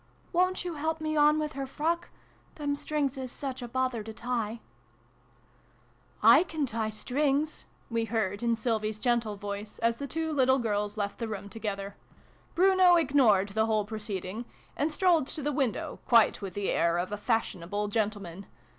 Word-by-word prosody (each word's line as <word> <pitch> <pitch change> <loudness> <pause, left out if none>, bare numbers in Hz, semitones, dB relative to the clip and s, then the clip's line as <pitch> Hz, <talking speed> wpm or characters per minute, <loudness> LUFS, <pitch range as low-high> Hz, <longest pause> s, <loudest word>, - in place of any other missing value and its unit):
" - - -33
Wo'n't 365 +1 +2
you 350 - -3
help 315 +1 -2
me 310 0 -2
on 300 0 +5
with 305 0 -2
her 275 -1 -4
frock? 325 +5 -1 0.5
Them 290 -2 -1
strings 285 -2 -1
is 255 -2 -5
such 270 -2 -5
a 245 - -5
bother 255 -1 -1
to 220 +1 -7
tie! 230 -1 -3 0.6
" - - -34
" - - -29
I - - +8
can 315 -4 -2
tie 225 -3 -2
strings," 280 +7 0 0.2
we 230 -1 -1
heard, 210 -3 -1
in 235 -1 +2
Sylvie's 215 -2 -1
gentle 235 -3 +1
voice, 205 +1 -6
as 230 0 0
the 280 - -4
two 320 +3 -2
little 260 -2 +4
girls 210 -3 -1
left 205 -1 -3
the 230 - -2
room 200 -2 -6
together. 200 -2 -5 0.6
Bruno 370 -1 +6
ignored 255 - +4
the 220 +2 +1
whole 215 -2 +1
proceeding, 210 0 -4 0.3
and 300 +3 0
strolled 335 -4 +3
to 300 - -4
the 295 - 0
window, 265 -6 -1
quite 230 -3 +5
with 195 -3 -6
the 205 -1 -1
air 170 0 +2
of 180 +3 -2
a - - -1
fashionable 205 -2 -1
gentleman. 200 -4 -2
235 Hz, 180 wpm, -29 LUFS, 210-290 Hz, 0.6 s, I